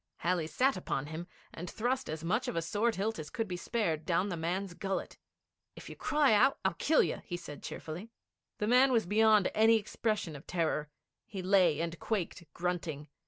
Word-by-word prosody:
Halley 170 -2 0
sat 265 +10 +2
upon 145 -6 -2
him, 160 +3 -6 0.3
and 175 +2 -6
thrust 250 +4 -1
as 155 +1 -4
much 215 +9 0
of 245 - -3
a 165 - +1
sword 215 +7 +1
hilt 215 +3 -1
as 150 -1 -6
could 225 +6 -2
be 180 - -3
spared 175 -5 -1
down 180 +4 +1
the 175 - -2
man's 175 +3 -2
gullet. 195 +2 -4 0.6
'If - - -10
you - - -8
cry 295 -6 +3
out, 255 +6 +5
I - - +3
kill 315 0 +3
you,' - - -2
he 175 - -4
said 150 -4 -9
cheerfully. 175 +8 -7 0.5
The 210 - -1
man 250 +4 +5
was 230 -5 +3
beyond 215 0 +4
any 225 +1 +5
expression 215 -5 -1
of 140 - -11
terror. 160 -3 -1 0.4
He 195 -3 -6
lay 180 -5 +4
and 170 0 -3
quaked, 175 -7 -3
grunting. 170 -4 -3
185 Hz, 195 wpm, -32 LUFS, 165-220 Hz, 0.6 s, out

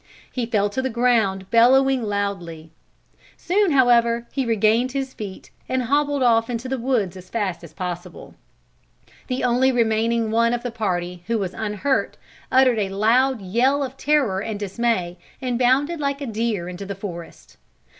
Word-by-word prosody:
He 245 -3 -3
fell 205 -3 +1
to 260 - -2
the 260 - -1
ground 225 -6 +1
bellowing 260 +3 +5
loudly. 195 -7 -4 0.7
Soon 400 +2 +1
however 235 -3 +3
he 265 -3 -2
regained 225 +3 +2
his 270 -1 -3
feet 200 -3 -8 0.2
and 260 0 0
hobbled 285 +2 +1
off 230 -1 +3
into 240 +1 -3
the 265 0 -2
woods 230 -7 0
as 185 0 -12
fast 195 -7 -3
as 170 - -11
possible. 175 +1 -7 0.9
The 255 0 -2
only 250 +2 +3
remaining 230 -1 +1
one 230 +1 +2
of 240 - -6
the 245 - -3
party 180 -5 -3
who 230 0 +1
was 190 -3 -3
unhurt 220 +5 -1 0.3
uttered 255 -3 +4
a 200 -2 -1
loud 225 +4 +2
yell 255 +9 +1
of 265 -1 -6
terror 270 -10 +1
and 215 -1 -4
dismay, 195 -4 -1 0.2
and 250 -2 -2
bounded 275 +7 +2
like 280 -1 -1
a 285 - -4
deer 220 -6 -2
into 180 +2 -7
the 200 - -5
forest. 175 -4 -9
230 Hz, 165 wpm, -22 LUFS, 200-260 Hz, 0.9 s, bellowing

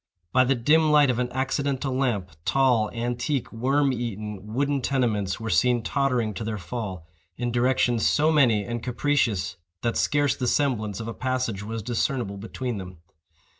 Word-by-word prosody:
By 130 - +5
the 135 +2 +2
dim 155 +6 +3
light 145 -3 +5
of 120 - -2
an 125 0 -1
accidental 135 0 -1
lamp, 115 -9 -1
tall, 125 -4 +3
antique, 120 +3 -2
worm 135 +4 +2
eaten, 105 -3 -5
wooden 140 +3 0
tenements 110 -8 0
were 110 -1 -3
seen 120 -2 +3
tottering 125 -5 0
to 100 - -5
their 110 -1 -3
fall, 95 -2 -5 0.3
in 120 0 -2
directions 120 -1 +2
so 155 +2 +3
many 120 -9 +3
and 120 +2 -4
capricious 120 -6 0 0.3
that 115 -1 0
scarce 145 -2 +2
the 125 - -2
semblance 110 -8 0
of 115 - -5
a 115 - -4
passage 125 -5 -2
was 110 +1 -5
discernible 120 -2 -1
between 115 +2 -4
them. 90 -1 -9
120 Hz, 165 wpm, -25 LUFS, 110-135 Hz, 0.3 s, By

